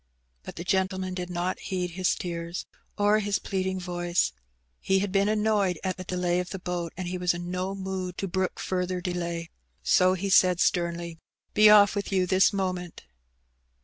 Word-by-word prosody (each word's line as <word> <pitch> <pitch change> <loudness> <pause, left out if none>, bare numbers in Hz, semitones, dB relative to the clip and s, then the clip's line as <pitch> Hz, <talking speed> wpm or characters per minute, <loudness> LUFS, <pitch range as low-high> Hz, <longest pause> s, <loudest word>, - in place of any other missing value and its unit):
But - - -9
the 170 - -5
gentleman 190 0 0
did 180 -1 -4
not 180 +1 -2
heed 180 -2 -3
his 185 +1 +1
tears 170 -1 -5 0.3
or 205 +1 +4
his 205 -1 0
pleading 190 -1 -2
voice. 175 - 0 0.5
He 190 - +1
had 195 0 -1
been 200 +1 +2
annoyed 210 -5 +1
at 185 -1 -2
the 185 - -6
delay 180 -1 0
of 180 -1 -3
the 195 - -5
boat, 175 -2 -4
and 185 -1 -4
he 180 +1 -3
was 180 -1 +1
in 175 0 -5
no 185 +2 -2
mood 190 -2 -4
to 195 - -2
brook 185 0 -2
further 180 0 -2
delay. 170 -2 -3 0.3
So 185 -1 +4
he 195 +1 -3
said 180 -1 +5
sternly— 170 -2 0 0.3
''Be 215 0 +7
off 205 -1 +7
with 200 0 -3
you 185 -2 +2
this 185 +2 +4
moment 185 -3 -3
185 Hz, 180 wpm, -27 LUFS, 175-190 Hz, 0.5 s, Be